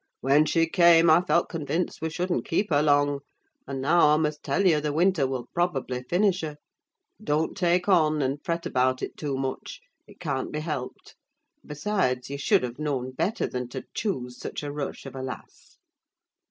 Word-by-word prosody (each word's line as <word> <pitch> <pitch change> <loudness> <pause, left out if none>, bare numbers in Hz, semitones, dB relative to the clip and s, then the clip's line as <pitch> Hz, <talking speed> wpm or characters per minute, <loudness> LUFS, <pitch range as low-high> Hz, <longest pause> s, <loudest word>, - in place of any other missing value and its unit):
When 140 +3 +4
she 165 -1 +2
came, 170 -1 +6
I 165 +2 +6
felt 175 -1 +1
convinced 160 +2 -3
we 160 - -1
shouldn't 175 +2 -2
keep 195 +3 0
her 145 -1 +4
long; 145 -1 +3 0.5
and 135 -1 -4
now, 155 +5 +4
I 150 0 +4
must 150 -1 -1
tell 175 +8 0
you, 160 -5 +4
the 150 0 -1
winter 165 -2 +2
will 130 -2 -4
probably 135 -8 -1
finish 180 +7 +1
her. 150 -2 -5 0.7
Don't 150 +2 0
take 180 -1 +1
on, 155 -6 +3
and 135 +2 -2
fret 170 0 -2
about 130 -4 +1
it - - -5
too 140 -3 -3
much: 135 - -4 0.3
it - - -17
can't 140 -6 -3
be 150 - -3
helped. 150 -5 -6 0.5
And - - -22
besides, 150 -6 -1
you 140 - -4
should 140 - +3
have 125 +2 -5
known 135 -4 -2
better 190 - -1
than 125 -1 -4
to 130 +1 -6
choose 125 - -3
such - - -6
a 145 - -4
rush 145 -1 -5
of 135 - -9
a 130 - -5
lass! 130 -1 -9
150 Hz, 190 wpm, -26 LUFS, 135-170 Hz, 0.7 s, came